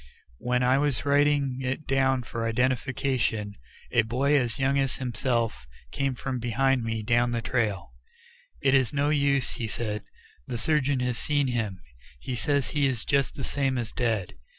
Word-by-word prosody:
While 125 Hz, 0 st, 0 dB
I 130 Hz, +2 st, +4 dB
was 140 Hz, -1 st, 0 dB
writing 145 Hz, -2 st, +2 dB
it 135 Hz, +4 st, -3 dB
down 135 Hz, -1 st, +2 dB
for 115 Hz, 0 st, -3 dB
identification, 125 Hz, -2 st, 0 dB, 0.4 s
a 115 Hz, -, +4 dB
boy 130 Hz, +6 st, +1 dB
as 120 Hz, -5 st, +1 dB
young 135 Hz, +1 st, +2 dB
as 135 Hz, -2 st, 0 dB
himself 115 Hz, -, -1 dB, 0.2 s
came 135 Hz, -2 st, -1 dB
from 130 Hz, 0 st, -3 dB
behind 125 Hz, +2 st, +1 dB
me 110 Hz, -1 st, -2 dB
down 120 Hz, +2 st, +2 dB
the 120 Hz, -1 st, -1 dB
trail. 105 Hz, -, -1 dB, 0.7 s
"It 135 Hz, -1 st, +4 dB
is 130 Hz, -3 st, +3 dB
no 145 Hz, +1 st, +1 dB
use," 140 Hz, -3 st, +2 dB
he 115 Hz, -, -4 dB
said; 105 Hz, -1 st, -3 dB, 0.5 s
"the 120 Hz, -, -3 dB
surgeon 140 Hz, +1 st, +1 dB
has 125 Hz, -1 st, -1 dB
seen 145 Hz, -3 st, +1 dB
him; 110 Hz, -6 st, -2 dB, 0.4 s
he 125 Hz, -, -5 dB
says 140 Hz, +3 st, 0 dB
he 145 Hz, -2 st, +2 dB
is 125 Hz, -4 st, -2 dB
just 140 Hz, -1 st, +1 dB
the 135 Hz, -, -5 dB
same 135 Hz, -2 st, 0 dB
as 120 Hz, -3 st, -3 dB
dead. 115 Hz, -7 st, -1 dB
125 Hz, 170 wpm, -27 LUFS, 115-140 Hz, 0.7 s, I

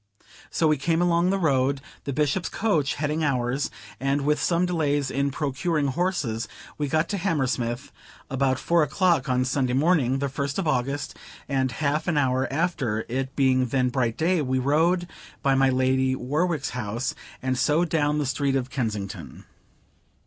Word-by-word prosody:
So 160 Hz, -, +1 dB
we 155 Hz, -1 st, +3 dB
came 165 Hz, +4 st, +1 dB
along 175 Hz, 0 st, +3 dB
the 195 Hz, -, +2 dB
road; 140 Hz, -5 st, +2 dB, 0.3 s
the 140 Hz, -, -2 dB
Bishop's 150 Hz, +5 st, 0 dB
coach 170 Hz, -10 st, 0 dB
heading 150 Hz, +2 st, -1 dB
ours; 130 Hz, -1 st, 0 dB, 0.3 s
and, 135 Hz, +2 st, 0 dB
with 150 Hz, +1 st, +1 dB
some 170 Hz, +2 st, +2 dB
delays 145 Hz, -6 st, 0 dB
in 140 Hz, +1 st, 0 dB
procuring 145 Hz, +1 st, -1 dB
horses, 135 Hz, -8 st, -1 dB, 0.3 s
we 145 Hz, -, -2 dB
got 155 Hz, +3 st, +1 dB
to 200 Hz, -, -1 dB
Hammersmith 130 Hz, -, -1 dB, 0.4 s
about 135 Hz, -1 st, +1 dB
four 170 Hz, +5 st, +2 dB
o'clock 155 Hz, -2 st, +2 dB
on 125 Hz, 0 st, +2 dB
Sunday 130 Hz, -1 st, 0 dB
morning, 135 Hz, -3 st, +3 dB
the 140 Hz, +1 st, -1 dB
first 140 Hz, +1 st, -3 dB
of 190 Hz, -4 st, -1 dB
August, 140 Hz, 0 st, -1 dB, 0.3 s
and 130 Hz, -2 st, 0 dB
half 150 Hz, +2 st, -1 dB
an 170 Hz, -4 st, +1 dB
hour 130 Hz, -2 st, +1 dB
after, 135 Hz, -8 st, -1 dB
it 130 Hz, +2 st, -3 dB
being 130 Hz, -2 st, +3 dB
then 125 Hz, +1 st, +1 dB
bright 120 Hz, -3 st, -1 dB
day, 170 Hz, +1 st, +2 dB
we 130 Hz, -2 st, 0 dB
rode 160 Hz, +7 st, +2 dB, 0.4 s
by 140 Hz, -2 st, +3 dB
my 135 Hz, 0 st, +4 dB
Lady 130 Hz, 0 st, +2 dB
Warwick's 150 Hz, +4 st, -1 dB
house, 120 Hz, 0 st, -3 dB, 0.3 s
and 130 Hz, 0 st, 0 dB
so 150 Hz, +6 st, +2 dB
down 150 Hz, -3 st, +1 dB
the 150 Hz, -, 0 dB
street 140 Hz, +1 st, 0 dB
of 130 Hz, -1 st, -2 dB
Kensington. 105 Hz, -6 st, -4 dB
140 Hz, 165 wpm, -25 LUFS, 130-160 Hz, 0.4 s, my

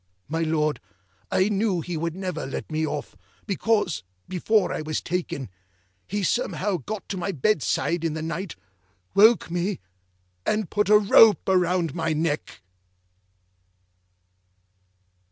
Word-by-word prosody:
My 160 Hz, +2 st, -2 dB
Lord, 155 Hz, -2 st, 0 dB, 0.5 s
I 185 Hz, -, +2 dB
knew 200 Hz, -3 st, +1 dB
he 175 Hz, +1 st, -5 dB
would 165 Hz, +1 st, -2 dB
never 180 Hz, -6 st, -4 dB
let 135 Hz, -, -6 dB
me 155 Hz, 0 st, 0 dB
off, 145 Hz, -1 st, -5 dB, 0.3 s
because, 205 Hz, -, 0 dB, 0.3 s
before 190 Hz, +2 st, +1 dB
I -, -, -3 dB
was 155 Hz, 0 st, -2 dB
taken, 170 Hz, -6 st, -3 dB, 0.6 s
he 205 Hz, +2 st, -2 dB
somehow 195 Hz, -2 st, 0 dB
got 200 Hz, -, -6 dB
to 195 Hz, -, -3 dB
my 185 Hz, +2 st, -2 dB
bedside 165 Hz, 0 st, 0 dB
in 160 Hz, -2 st, -1 dB
the 160 Hz, -, -4 dB
night, 165 Hz, +2 st, -4 dB, 0.6 s
woke 220 Hz, -3 st, +5 dB
me, 175 Hz, +2 st, -1 dB, 0.6 s
and 210 Hz, -, -1 dB
put 210 Hz, -1 st, +1 dB
a 210 Hz, -, +8 dB
rope 210 Hz, +1 st, +6 dB
round 180 Hz, -4 st, +2 dB
my 165 Hz, -2 st, -1 dB
neck. 150 Hz, -, -2 dB
175 Hz, 130 wpm, -25 LUFS, 160-200 Hz, 0.6 s, a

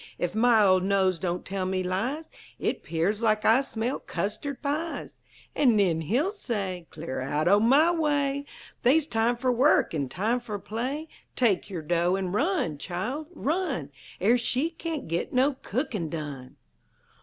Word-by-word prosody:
Ef 175 Hz, -, -1 dB
my 225 Hz, 0 st, +5 dB
old 185 Hz, -1 st, +5 dB
nose 190 Hz, -2 st, +2 dB
don't 175 Hz, +1 st, -2 dB
tell 195 Hz, 0 st, -3 dB
me 185 Hz, 0 st, -1 dB
lies, 245 Hz, -, -2 dB, 0.3 s
It -, -, -2 dB
'pears 180 Hz, +7 st, -1 dB
like 215 Hz, -2 st, +2 dB
I 230 Hz, +4 st, +6 dB
smell 245 Hz, -1 st, -3 dB
custard 210 Hz, +10 st, -3 dB
pies!" 305 Hz, +4 st, -3 dB, 0.4 s
An' 250 Hz, -6 st, +4 dB
nen 180 Hz, -6 st, +2 dB
he'll 250 Hz, -, +1 dB
say, 195 Hz, -, -4 dB
"'Clear 155 Hz, -5 st, -5 dB
out 145 Hz, +4 st, -1 dB
o' 200 Hz, +3 st, +6 dB
my 275 Hz, +10 st, +5 dB
way! 290 Hz, -4 st, 0 dB, 0.3 s
They's 280 Hz, +5 st, +4 dB
time 235 Hz, -3 st, +1 dB
fer 255 Hz, +1 st, +1 dB
work 265 Hz, -, +3 dB
an' 140 Hz, -5 st, -2 dB
time 220 Hz, -, 0 dB
fer 225 Hz, -4 st, -5 dB
play! 255 Hz, +10 st, -4 dB, 0.3 s
Take 220 Hz, -7 st, +2 dB
yer 175 Hz, -5 st, -5 dB
dough, 175 Hz, +3 st, +2 dB
an' 190 Hz, -2 st, -2 dB
run, 255 Hz, -, 0 dB
Child; 230 Hz, -, -4 dB
run! 295 Hz, -, -1 dB, 0.3 s
Er 235 Hz, +6 st, +4 dB
she 260 Hz, +7 st, 0 dB
cain't 325 Hz, -2 st, -5 dB
git 170 Hz, +1 st, -2 dB
no 265 Hz, +3 st, +3 dB
cookin' 210 Hz, -, -2 dB
done!'" 145 Hz, -5 st, -6 dB
220 Hz, 160 wpm, -27 LUFS, 180-275 Hz, 0.4 s, I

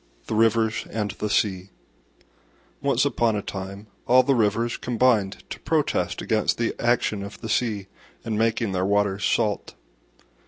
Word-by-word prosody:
THE -, -, -4 dB
RIVERS 110 Hz, 0 st, +2 dB
AND 105 Hz, -2 st, -2 dB
THE 105 Hz, -, -4 dB
SEA 95 Hz, -2 st, 0 dB, 1.1 s
Once -, -, +2 dB
upon 115 Hz, -2 st, +1 dB
a 105 Hz, -, -2 dB
time 100 Hz, +1 st, -6 dB, 0.2 s
all 130 Hz, +1 st, +6 dB
the 140 Hz, -, +2 dB
Rivers 115 Hz, 0 st, +1 dB
combined 115 Hz, -5 st, +1 dB
to -, -, -5 dB
protest -, -, 0 dB
against 110 Hz, -1 st, +1 dB
the 115 Hz, -1 st, 0 dB
action 120 Hz, -3 st, +1 dB
of 100 Hz, +1 st, -8 dB
the 110 Hz, -, -6 dB
Sea 105 Hz, -4 st, 0 dB, 0.4 s
in 115 Hz, -2 st, -2 dB
making 115 Hz, 0 st, +1 dB
their 90 Hz, -1 st, 0 dB
waters 100 Hz, 0 st, +1 dB
salt. 105 Hz, 0 st, 0 dB
110 Hz, 150 wpm, -24 LUFS, 100-115 Hz, 1.1 s, all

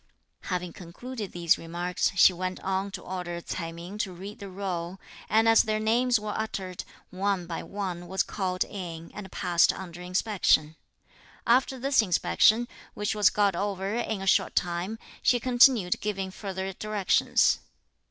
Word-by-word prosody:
Having 180 Hz, -2 st, -3 dB
concluded 205 Hz, +4 st, -7 dB
these 170 Hz, -2 st, +2 dB
remarks, 175 Hz, +2 st, -1 dB
she 185 Hz, 0 st, +7 dB
went 185 Hz, +1 st, -4 dB
on 190 Hz, +1 st, -1 dB
to -, -, -8 dB
order 180 Hz, -2 st, -5 dB
Ts'ai 165 Hz, -1 st, -5 dB
Ming 175 Hz, +5 st, -9 dB
to 200 Hz, -4 st, -1 dB
read 195 Hz, +4 st, -9 dB
the 200 Hz, -, -8 dB
roll; 185 Hz, -1 st, -4 dB, 0.3 s
and, 220 Hz, +2 st, +4 dB
as 225 Hz, 0 st, +7 dB
their 215 Hz, -1 st, -1 dB
names 235 Hz, +2 st, +2 dB
were 210 Hz, 0 st, -4 dB
uttered, 190 Hz, -4 st, -4 dB, 0.3 s
one 190 Hz, -1 st, -1 dB
by 170 Hz, -1 st, -5 dB
one 185 Hz, -4 st, -5 dB
was 190 Hz, +2 st, +1 dB
called 185 Hz, -2 st, -2 dB
in, 170 Hz, -4 st, -7 dB
and 195 Hz, -3 st, -8 dB
passed 175 Hz, -2 st, +3 dB
under 175 Hz, -2 st, -8 dB
inspection. 180 Hz, -4 st, +1 dB, 0.7 s
After 260 Hz, +2 st, +3 dB
this 270 Hz, 0 st, +3 dB
inspection, 220 Hz, +4 st, +3 dB, 0.3 s
which 210 Hz, 0 st, -1 dB
was 210 Hz, -1 st, +5 dB
got 200 Hz, -3 st, +2 dB
over 195 Hz, +1 st, -2 dB
in 220 Hz, -4 st, -2 dB
a -, -, -4 dB
short 190 Hz, -, +2 dB
time, 180 Hz, +5 st, -1 dB, 0.2 s
she 245 Hz, -, +3 dB
continued 245 Hz, -6 st, +4 dB
giving 195 Hz, -2 st, -3 dB
further 190 Hz, -1 st, -5 dB
directions. 210 Hz, 0 st, +2 dB
190 Hz, 155 wpm, -27 LUFS, 180-215 Hz, 0.7 s, she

